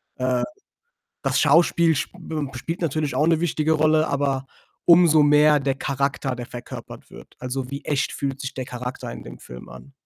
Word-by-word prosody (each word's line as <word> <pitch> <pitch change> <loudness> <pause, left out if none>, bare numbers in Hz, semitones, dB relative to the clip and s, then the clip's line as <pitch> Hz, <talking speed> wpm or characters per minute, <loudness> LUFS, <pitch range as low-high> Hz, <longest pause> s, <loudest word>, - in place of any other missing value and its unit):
Äh. 130 -1 0 0.8
Das - - +1
Schauspiel 165 +2 +4
sp 145 - -3 0.2
m 150 -4 -3
spielt 165 +7 -5
natürlich 155 -2 -1
auch 150 - +3
'ne 165 -1 +3
wichtige 160 -2 +1
Rolle, 155 0 +3
aber, 135 -1 -1 0.4
umso 170 -3 +6
mehr 150 0 +5
der 135 0 0
Charakter, 135 -1 -2
der 120 0 -6
verkörpert 120 -1 -10
wird. - - -14
Also, 130 +1 -4
wie 140 +1 -5
echt 145 -2 0
fühlt 135 -1 -4
sich 130 -2 -5
der 130 - -5
Charakter 125 +1 -6
in - - -9
dem - - -11
Film 60 0 -11
an? 140 - -13
140 Hz, 180 wpm, -23 LUFS, 130-155 Hz, 0.8 s, umso